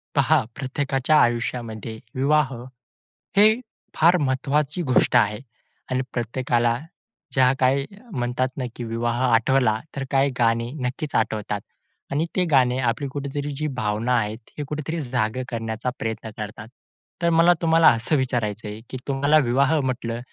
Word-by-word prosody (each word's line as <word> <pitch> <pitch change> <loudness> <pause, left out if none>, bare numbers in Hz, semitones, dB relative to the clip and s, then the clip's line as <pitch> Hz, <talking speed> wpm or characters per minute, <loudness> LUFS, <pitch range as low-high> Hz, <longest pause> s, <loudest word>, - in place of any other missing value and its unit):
पहा, - - +4
प्रत्येकाच्या 135 +2 0
आयुष्यामध्ये 115 -2 -2 0.2
विवाह 140 +1 +2 0.8
ही 215 +3 +6 0.4
फार 170 +3 +5
महत्त्वाची 145 +2 0
गोष्ट 130 -3 +2
आहे. 105 -3 +3 0.5
आणि 130 0 +1
प्रत्येकाला 120 0 0 0.6
ज्या 130 -1 +5
काही 135 +1 +2 0.3
म्हणतात 125 -3 -1
ना 130 - -2
की 120 - -6
विवाह 115 +1 -2
आठवला 115 -1 +3 0.2
तर 135 - -2
काही 135 +1 +3
गाणी 115 0 +2
नक्कीच 130 +3 -3
आठवतात. 105 -2 -1 0.5
आणि 150 +4 +1
ती 185 - +2
गाणी 125 -3 +4
आपली 125 +3 0
कुठेतरी 145 +1 -4
जी 155 +2 -2
भावना 110 +2 0
आहेत, 105 0 -1 0.2
ही 150 - -3
कुठेतरी 155 +3 -3
जाग 120 -3 -1
करण्याचा 115 0 -3
प्रयत्न 110 0 -4
करतात. 105 0 -7 0.5
तर 170 - +3
मला 165 +1 +5
तुम्हाला 165 0 +5
असं 115 +7 0
विचारायचं 115 -5 -2
आहे 105 +1 -6
की 130 - -5
तुम्हाला 140 +2 +3
विवाह 140 +5 +3
म्हटलं 120 -3 -2
130 Hz, 140 wpm, -23 LUFS, 115-140 Hz, 0.8 s, ही